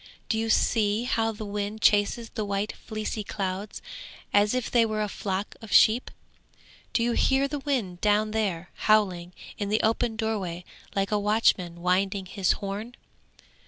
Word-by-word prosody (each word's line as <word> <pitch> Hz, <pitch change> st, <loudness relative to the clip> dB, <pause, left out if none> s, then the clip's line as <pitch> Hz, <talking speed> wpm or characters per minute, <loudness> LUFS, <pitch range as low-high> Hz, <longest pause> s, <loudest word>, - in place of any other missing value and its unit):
Do 220 Hz, -, +1 dB
you 225 Hz, 0 st, -1 dB
see 215 Hz, 0 st, +2 dB
how 225 Hz, -2 st, +1 dB
the 215 Hz, 0 st, -7 dB
wind 205 Hz, +1 st, -3 dB
chases 210 Hz, +2 st, +3 dB
the 215 Hz, -, -3 dB
white 200 Hz, +1 st, -1 dB
fleecy 215 Hz, -1 st, -5 dB
clouds 195 Hz, 0 st, -4 dB, 0.5 s
as 205 Hz, +3 st, +4 dB
if 255 Hz, -2 st, -2 dB
they 235 Hz, -2 st, +5 dB
were 215 Hz, -1 st, 0 dB
a -, -, -1 dB
flock 195 Hz, 0 st, -3 dB
of 225 Hz, -, -10 dB
sheep? 230 Hz, +4 st, +5 dB, 0.8 s
Do 230 Hz, -, +1 dB
you 240 Hz, -, +1 dB
hear 270 Hz, +3 st, +2 dB
the 290 Hz, +1 st, -4 dB
wind 240 Hz, -11 st, -2 dB
down 210 Hz, +1 st, +2 dB
there, 190 Hz, -6 st, -2 dB, 0.2 s
howling 185 Hz, -5 st, +3 dB, 0.3 s
in 205 Hz, -1 st, -2 dB
the 215 Hz, +1 st, +2 dB
open 225 Hz, +1 st, +1 dB
doorway 200 Hz, -6 st, -3 dB, 0.3 s
like 195 Hz, +1 st, 0 dB
a 210 Hz, -, +2 dB
watchman 195 Hz, -5 st, +1 dB
winding 190 Hz, +2 st, +1 dB
his 190 Hz, 0 st, +1 dB
horn? 205 Hz, +4 st, -5 dB
210 Hz, 160 wpm, -27 LUFS, 195-225 Hz, 0.8 s, they